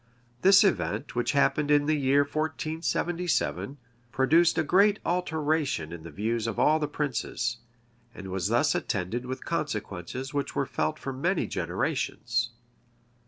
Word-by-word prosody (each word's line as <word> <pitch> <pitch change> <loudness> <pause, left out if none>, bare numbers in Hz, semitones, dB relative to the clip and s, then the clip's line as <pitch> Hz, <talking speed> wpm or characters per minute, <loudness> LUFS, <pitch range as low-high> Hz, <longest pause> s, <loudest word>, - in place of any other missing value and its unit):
This 195 +3 +7
event, 185 -8 0
which 120 +5 0
happened 145 +1 +2
in 145 -1 +4
the 155 - +2
year 140 0 +3
1477, 160 +1 -1 0.3
produced 160 +6 +3
a 160 - +3
great 200 +6 +4
alteration 155 - 0
in 85 -1 -7
the 85 - -9
views 110 +7 -2
of 115 - -3
all 155 +1 +4
the 150 - -1
princes, 120 -4 -2 0.6
and 95 -1 -8
was 95 +1 -1
attended 115 -1 0
with 130 +1 -5
consequences 130 - -4
which 140 -1 -2
were 140 - +1
felt 95 - -2
for 135 - -5
many 170 +8 0
generations. 120 +1 -1
140 Hz, 135 wpm, -27 LUFS, 115-155 Hz, 0.6 s, This